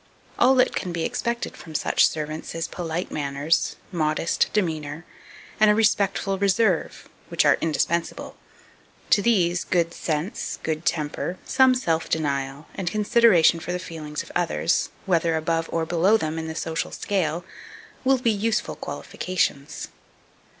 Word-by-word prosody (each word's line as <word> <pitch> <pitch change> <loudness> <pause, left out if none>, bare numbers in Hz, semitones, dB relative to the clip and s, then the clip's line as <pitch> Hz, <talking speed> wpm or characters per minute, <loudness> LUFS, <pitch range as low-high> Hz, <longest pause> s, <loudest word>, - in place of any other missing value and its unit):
All 260 +2 +6
that 255 - +3
can 180 - -2
be 170 -1 -2
expected 235 +6 -2
from 160 -2 -11
such - - +4
servants 155 +1 -5
is 165 0 -2
polite 170 0 -4
manners, 145 +2 0 0.2
modest 155 -2 +1
demeanour, 160 -5 -2 0.5
and 215 0 +6
a 210 - +5
respectful 200 -3 +1
reserve, 195 -2 +1 0.2
which - - +1
are - - +5
indispensable. 165 +1 -1 0.8
To 205 - +6
these, 180 -6 +2
good 170 -2 0
sense, 160 +5 -3
good 160 +1 -2
temper, 160 +3 -1
some 260 -1 +4
self 165 -10 -1
denial, 140 -2 -2
and 185 -3 -2
consideration 210 -5 +4
for 175 - -5
the 180 - -1
feelings 155 -4 -6
of - - -13
others, 175 -1 +1 0.2
whether 170 -3 +2
above 165 +1 -1
or 165 -1 0
below 175 +6 +3
them 160 -3 -3
in 160 - -4
the 160 - -5
social 165 0 -2
scale, 175 -4 -1 0.6
will 270 0 +4
be 240 -2 +2
useful 220 +2 -1
qualifications. 155 -6 -3
170 Hz, 145 wpm, -24 LUFS, 160-200 Hz, 0.8 s, All